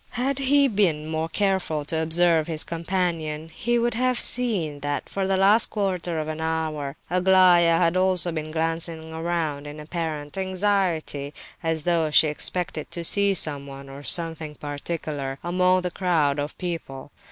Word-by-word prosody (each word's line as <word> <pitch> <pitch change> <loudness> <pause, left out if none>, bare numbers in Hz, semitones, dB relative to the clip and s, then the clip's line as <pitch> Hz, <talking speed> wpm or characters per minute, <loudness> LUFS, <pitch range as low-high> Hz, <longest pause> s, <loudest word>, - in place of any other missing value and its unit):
Had 260 +3 -1
he 280 +1 +4
been 190 - +1
more 160 +1 -2
careful 190 -6 0
to 160 +2 -1
observe 165 0 +3
his 160 -2 +1
companion, 165 -2 -2
he 240 +9 -1
would 235 0 +1
have 250 +1 +1
seen 195 -13 +2
that 145 0 -3
for 195 -1 -2
the 190 0 +1
last 205 +4 +5
quarter 180 -5 -2
of 155 - -3
an 155 0 -4
hour 155 -3 -2 0.2
Aglaya 180 -2 +5
had 170 0 +2
also 185 -1 +2
been 155 -1 -4
glancing 160 0 -3
around 160 -3 -2
in 145 +1 -8
apparent 155 0 -4
anxiety, 185 -7 -1 0.3
as 165 -2 -1
though 165 -2 +1
she 150 +1 +5
expected 155 0 -2
to 170 - -4
see 200 +3 +4
someone, 140 -4 -2
or 135 +1 -9
something 160 -1 0
particular, 145 -2 -5
among 180 +1 +2
the 180 0 -3
crowd 160 -6 +1
of 145 +1 -4
people. 155 -6 -6
165 Hz, 155 wpm, -24 LUFS, 155-185 Hz, 0.3 s, last